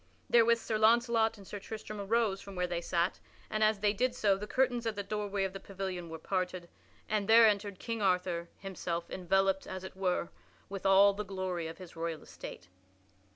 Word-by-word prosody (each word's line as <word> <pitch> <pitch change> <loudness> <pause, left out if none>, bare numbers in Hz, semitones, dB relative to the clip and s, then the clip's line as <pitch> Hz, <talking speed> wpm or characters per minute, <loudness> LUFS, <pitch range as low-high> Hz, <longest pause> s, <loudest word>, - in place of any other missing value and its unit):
Therewith 235 0 +6
Sir 220 -1 -2
Launcelot 230 0 +4
and 200 - -13
Sir 205 - -6
Tristram 215 0 -7
arose 210 -1 +1
from 200 -1 -10
where 180 0 0
they 175 -1 -2
sat, 175 +1 0 0.3
and 215 0 +1
as 215 -2 +3
they 205 -1 +3
did 250 +4 0
so 205 -5 +3
the 205 +2 -6
curtains 245 -2 +1
at 220 - -1
the 200 - -3
doorway 205 -1 -2
of 190 -1 -2
the 195 - -6
pavilion 190 -3 -5
were 160 - -6
parted 180 0 -2 0.4
and 210 -1 -1
there 230 +1 +9
entered 205 -2 +1
King 230 +1 -4
Arthur 180 -3 +1
himself 175 -3 -4
enveloped, 195 +1 +1
as 185 0 -6
it 190 - -8
were, 180 -2 0 0.4
with 195 0 -3
all 200 +1 +7
the 210 +1 -4
glory 185 -4 -3
of 165 - -8
his 185 -3 -11
royal 165 -1 -4
estate. 90 - -10
195 Hz, 200 wpm, -32 LUFS, 185-215 Hz, 0.4 s, there